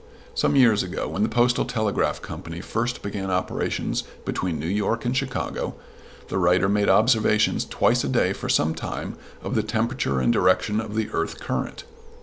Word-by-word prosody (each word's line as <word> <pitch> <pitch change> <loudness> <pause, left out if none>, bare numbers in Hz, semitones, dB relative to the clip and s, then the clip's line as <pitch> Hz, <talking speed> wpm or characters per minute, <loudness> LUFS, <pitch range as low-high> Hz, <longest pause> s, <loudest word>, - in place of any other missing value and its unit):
Some 465 - +1
years 115 -6 +5
ago, 90 0 -3
when - - -3
the 110 - +2
Postal 120 +2 +3
Telegraph 110 -4 -1
Company 85 +1 -7
first 120 +6 -2
began 100 -1 -3
operations 90 0 -1 0.2
between 90 -4 -2
New 75 - -5
York 105 +5 0
and 120 +2 0
Chicago, 135 -1 -2 0.5
the 95 - -1
writer 90 +1 +4
made 100 +1 +2
observations 110 -1 +3
twice - - +2
a - - -1
day - - +2
for - - -6
some 80 +2 +3
time 80 - -5 0.3
of - - -3
the 110 - +2
temperature 110 - -1
and 120 - +3
direction 105 +2 +2
of 110 -1 -7
the 110 -1 -1
earth 80 - -2
current. - - -3
105 Hz, 170 wpm, -24 LUFS, 90-115 Hz, 0.5 s, years